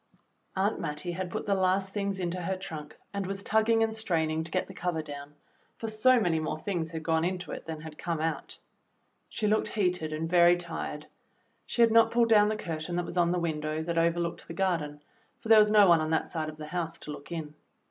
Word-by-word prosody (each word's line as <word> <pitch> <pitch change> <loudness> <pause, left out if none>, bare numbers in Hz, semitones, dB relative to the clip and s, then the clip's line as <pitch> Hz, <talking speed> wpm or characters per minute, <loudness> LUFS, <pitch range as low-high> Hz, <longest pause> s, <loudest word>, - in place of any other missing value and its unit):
Aunt 195 +3 +1
Mattie 150 +2 -3
had 180 +1 -4
put - - -4
the 200 - +1
last 190 0 +1
things 200 -2 -2
into 180 0 -2
her 190 +2 -2
trunk 155 -6 -8 0.2
and 200 -2 -2
was 195 0 -4
tugging 225 +1 +3
and 220 0 0
straining 160 -7 0
to 165 - -9
get 185 +2 0
the 190 - -10
cover 175 -3 -2
down, 145 0 -9 0.4
for 225 - -4
so 240 +4 +4
many 175 -6 +1
more 155 0 -2
things 170 -1 -3
had 160 -1 -6
gone 160 0 +1
into 180 +1 -2
it - - -7
than 160 -1 -5
had 155 -1 -10
come 170 -2 -2
out. 160 +1 -3 0.7
She 220 - -3
looked 215 +1 +2
heated 180 -7 -1
and 155 +1 -2
very 175 0 +5
tired. 165 -3 -5 0.6
She 235 - +3
had 230 - +5
not 225 0 +6
pulled 235 0 +2
down 210 -2 +6
the 215 - -1
curtain 165 -2 -4
that 175 0 -1
was 170 - -7
on 170 -1 +4
the 180 - +1
win 165 -3 -1
dow 155 +1 -2
that 170 0 0
overlooked 170 0 0
the 165 - -7
garden, 160 -6 -1 0.4
for 225 - -9
there 220 -1 +9
was 210 0 +5
no 210 -1 +7
one 170 -2 +6
on 155 - -1
that 160 - 0
side 155 -2 -3
of 155 - -10
the 155 - -7
house 165 -2 -3
to 150 - -8
look 145 +2 -10
in. 160 -3 -5
175 Hz, 235 wpm, -29 LUFS, 160-195 Hz, 0.7 s, there